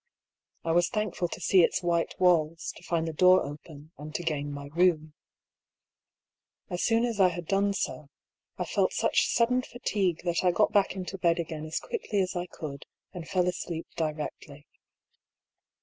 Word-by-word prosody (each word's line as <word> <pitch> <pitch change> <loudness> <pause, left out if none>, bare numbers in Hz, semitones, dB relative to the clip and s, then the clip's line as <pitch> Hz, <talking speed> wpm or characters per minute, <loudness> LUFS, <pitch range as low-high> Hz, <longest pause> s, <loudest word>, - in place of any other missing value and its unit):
I 165 - +1
was 175 +1 +3
thankful 210 -5 -1
to - - -7
see 190 - +4
its 175 - +2
white 170 -1 0
walls, 165 -3 +2
to - - -13
find 170 -2 -1
the 160 - -3
door 185 +3 +5
open, 150 +1 -10
and 150 +1 -9
to 175 - -2
gain 145 -3 -2
my 140 0 -6
room. 165 -3 +2 1.6
As 175 - -2
soon 230 0 +3
as 230 -4 -3
I 190 - +7
had 175 -1 -4
done 200 +3 +1
so, 150 -6 -3 0.5
I - - -2
felt - - +1
such - - +2
sudden 245 +2 +2
fatigue 200 -9 -1
that 175 0 0
I 180 - +4
got 175 - +2
back 200 -2 +3
into 190 0 -5
bed 170 -1 +3
again 160 -2 -4
as 160 - -2
quickly 220 - -3
as 185 0 0
I 175 0 -2
could, 145 -5 -8 0.3
and 170 -3 -7
fell 180 -1 +1
asleep 170 -2 -3
directly. 150 -2 -5
175 Hz, 175 wpm, -28 LUFS, 155-185 Hz, 1.6 s, I